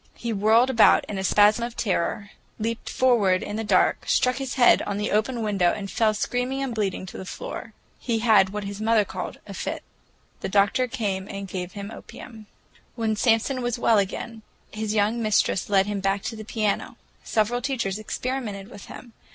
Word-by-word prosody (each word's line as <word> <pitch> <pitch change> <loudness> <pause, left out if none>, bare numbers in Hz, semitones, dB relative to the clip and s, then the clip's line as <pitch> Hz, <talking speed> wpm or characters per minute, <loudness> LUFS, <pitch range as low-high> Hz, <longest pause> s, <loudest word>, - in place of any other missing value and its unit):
He 235 -1 -4
whirled 220 +5 +4
about 230 -4 +5
in 200 - -5
a - - -3
spasm 210 +4 +4
of 235 0 -5
terror, 200 -1 -1 0.3
leaped 230 +1 -3
forward 215 -8 +3
in 205 - -5
the 225 - -2
dark, 195 -4 +2
struck 250 0 +2
his 270 -2 -4
head 250 -3 +5
on 200 -1 -3
the 210 +1 -2
open 225 +3 0
window, 195 -5 +2
and 195 -2 -6
fell 220 -2 +2
screaming 250 +5 -2
and 265 -3 -3
bleeding 200 -4 -2
to 185 - -9
the - - -6
floor. - - -7 0.3
He 235 -2 -1
had 220 -4 +4
what 210 +1 -5
his 200 +1 -6
mother 220 -1 +3
called - - -6
a - - -9
fit. - - -4 0.6
The - - -4
doctor 205 +6 +2
came 200 -6 -3
and 200 -1 -6
gave 180 -1 -5
him 200 +1 -7
opium. 220 -2 -11 0.5
When 225 -2 0
Samson 230 +4 +1
was 240 0 -1
well 230 -2 +3
again, 220 +3 -4 0.3
his 215 0 -3
young 215 +3 +1
mistress 215 -3 +1
led 195 -1 +4
him 205 -1 -3
back 195 0 0
to 230 - -4
the 215 - -8
piano. 215 -2 -2 0.3
Several 225 +3 0
teachers 230 -7 -2
experimented 215 -3 -4
with 200 - -11
him. 235 - -11
215 Hz, 190 wpm, -24 LUFS, 200-235 Hz, 0.6 s, about